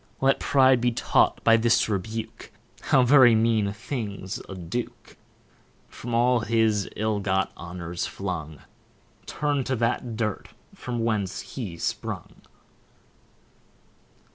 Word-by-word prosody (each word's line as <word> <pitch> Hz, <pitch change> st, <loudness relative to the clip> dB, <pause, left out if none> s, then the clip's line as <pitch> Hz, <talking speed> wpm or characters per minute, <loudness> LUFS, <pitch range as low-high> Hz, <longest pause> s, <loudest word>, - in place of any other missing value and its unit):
Let 135 Hz, 0 st, +3 dB
pride 130 Hz, -3 st, +4 dB
be 120 Hz, 0 st, +2 dB
taught 115 Hz, -, +1 dB
by 115 Hz, 0 st, +6 dB
this 115 Hz, +1 st, +3 dB
rebuke, 110 Hz, +2 st, -5 dB, 0.4 s
How 130 Hz, -, +5 dB
very 125 Hz, -2 st, +7 dB
mean 110 Hz, -2 st, +2 dB
a -, -, -2 dB
thing's 105 Hz, -4 st, -5 dB
a 95 Hz, -, -6 dB
Duke; 95 Hz, +7 st, -6 dB, 0.7 s
From 120 Hz, 0 st, -5 dB
all 120 Hz, +1 st, +3 dB
his 110 Hz, -3 st, +1 dB
ill 110 Hz, -1 st, -1 dB
got 95 Hz, -1 st, 0 dB
honours 85 Hz, 0 st, -5 dB
flung, 80 Hz, -6 st, -5 dB, 0.7 s
Turn'd 145 Hz, -3 st, -1 dB
to 130 Hz, -, 0 dB
that 120 Hz, 0 st, -1 dB
dirt 110 Hz, -3 st, -3 dB, 0.2 s
from 120 Hz, -2 st, -4 dB
whence 105 Hz, -5 st, -1 dB
he 100 Hz, -11 st, -5 dB
sprung. -, -, -4 dB
110 Hz, 120 wpm, -25 LUFS, 100-120 Hz, 0.7 s, very